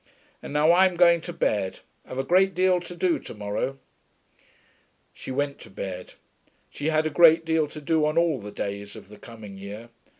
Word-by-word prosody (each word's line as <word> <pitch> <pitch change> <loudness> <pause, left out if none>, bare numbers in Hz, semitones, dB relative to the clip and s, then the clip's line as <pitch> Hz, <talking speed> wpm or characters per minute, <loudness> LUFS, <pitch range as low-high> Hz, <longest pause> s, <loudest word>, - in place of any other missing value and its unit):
And - - -8
now 150 +3 +4
I'm 185 0 +4
going 170 -1 +5
to 175 - -6
bed. 100 - -1 0.3
I've 130 - -7
a 135 - 0
great 185 +5 +3
deal 185 0 +3
to 175 0 -9
do 175 0 +1
to - - -10
morrow.' 105 +6 -3 1.4
She - - -10
went 140 +1 -2
to - - -13
bed. 95 -1 -7 0.6
She 145 - -4
had 155 0 +2
a 155 - -1
great 165 0 +6
deal 160 -2 +1
to 150 - -9
do 155 +1 +1
on 155 +2 -2
all 170 -5 +2
the 105 - -8
days 100 0 -5
of - - -12
the 105 0 -14
coming 105 -4 -11
year. 105 +4 -9
150 Hz, 195 wpm, -25 LUFS, 105-170 Hz, 1.4 s, great